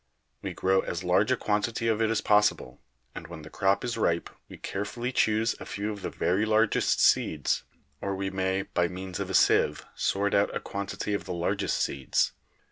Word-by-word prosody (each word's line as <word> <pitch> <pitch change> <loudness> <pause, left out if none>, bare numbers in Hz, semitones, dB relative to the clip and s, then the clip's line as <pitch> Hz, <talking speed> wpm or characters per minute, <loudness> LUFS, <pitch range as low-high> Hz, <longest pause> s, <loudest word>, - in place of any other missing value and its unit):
We - - -4
grow 95 0 +2
as 85 -1 -3
large 90 +6 +2
a 130 - +3
quantity 110 +2 -1
of 110 -1 +1
it 110 - +2
as 115 - +1
possible, 105 - +2 0.3
and 80 - -8
when 80 -2 -9
the 75 - -11
crop 95 0 +1
is 115 -2 -3
ripe 85 -5 0 0.2
we - - -10
carefully 120 +5 -4
choose 110 -2 +2
a - - -8
few 105 +1 -3
of 100 -1 -7
the - - -3
very 95 +4 0
largest 110 0 +2
seeds - - +2 0.4
or 100 -1 -2
we 95 0 -3
may 95 0 0
by 85 -2 0
means 90 0 -6
of - - -3
a - - -1
sieve - - +3
sort 100 +1 0
out 100 0 +2
a - - 0
quantity 100 +1 -4
of 100 - -2
the 90 - -4
largest 85 0 -1
seeds. 70 -1 0
100 Hz, 200 wpm, -28 LUFS, 95-110 Hz, 0.4 s, a